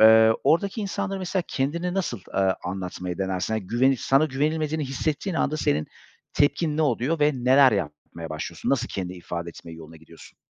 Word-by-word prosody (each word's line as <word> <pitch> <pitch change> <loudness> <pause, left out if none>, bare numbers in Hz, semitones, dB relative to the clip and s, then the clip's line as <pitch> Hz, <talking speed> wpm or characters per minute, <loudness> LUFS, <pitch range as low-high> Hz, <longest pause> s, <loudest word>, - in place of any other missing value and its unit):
Eee, 110 0 +8
oradaki 180 +9 +2
insanlara 195 -1 -3
mesela 185 0 -1
kendini 170 +7 -1
nasıl, 175 - -2
eee, 95 -1 +2
anlatmayı 90 -1 -4
denersin? 95 +1 -1
Hani, 110 -4 -3
güvenip 125 +4 +2
sana 135 +3 +3
güvenilmediğini 155 +2 -1
hissettiğin 155 +7 -2
anda 155 - 0
senin 75 - 0 0.5
tepkin 150 +1 +1
ne 160 - +2
oluyor 145 +3 0
ve 150 +1 +4
neler 130 +1 +5
yapmaya 80 -2 -4
başlıyorsun? 80 +2 -4
Nasıl 130 -2 +1
kendi 90 -2 -4
ifade 85 -1 -6
etme 85 0 -10
yoluna 80 0 -11
gidiyorsun? 80 +1 -16
125 Hz, 165 wpm, -25 LUFS, -, 0.5 s, Eee